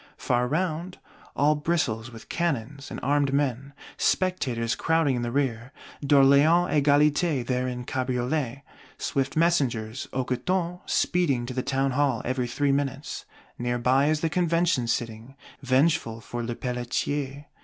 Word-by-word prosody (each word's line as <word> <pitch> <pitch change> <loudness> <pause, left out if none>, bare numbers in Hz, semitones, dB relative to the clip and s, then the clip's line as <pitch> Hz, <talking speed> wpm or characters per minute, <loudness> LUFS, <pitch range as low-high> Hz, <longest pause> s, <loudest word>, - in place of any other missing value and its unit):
Far 125 0 0
round, 170 +4 -2 0.4
all 145 +2 +4
bristles 150 -8 -1
with 115 -1 -12
cannons 140 -4 -2
and - - -6
armed 140 0 +2
men: 140 -1 -1 0.3
spectators 125 -11 0
crowding 160 -4 +1
in 120 - -2
the 120 - -2
rear; 125 -2 -1 0.3
D'Orléans 145 +5 +5
Égalité 145 -1 +3
there 125 +1 -1
in 125 -1 -4
cabriolet. 130 +1 -2 0.3
Swift 135 -1 -2
messengers, 130 -9 +1
hoquetons, 170 +8 -1
speed 140 -10 +1
to 130 - -4
the 130 - -1
Town 135 0 0
hall, 135 -3 +1
every 125 -1 -1
three 140 +3 0
minutes: 140 0 -2 0.3
near 120 0 -1
by 130 +4 +3
is 155 0 +1
the 165 - +1
Convention 170 -7 +1
sitting, 115 +2 -3 0.3
vengeful 130 -3 +1
for 120 +1 -6
Lepelletier. 130 +4 -3
135 Hz, 135 wpm, -26 LUFS, 125-150 Hz, 0.4 s, D'Orléans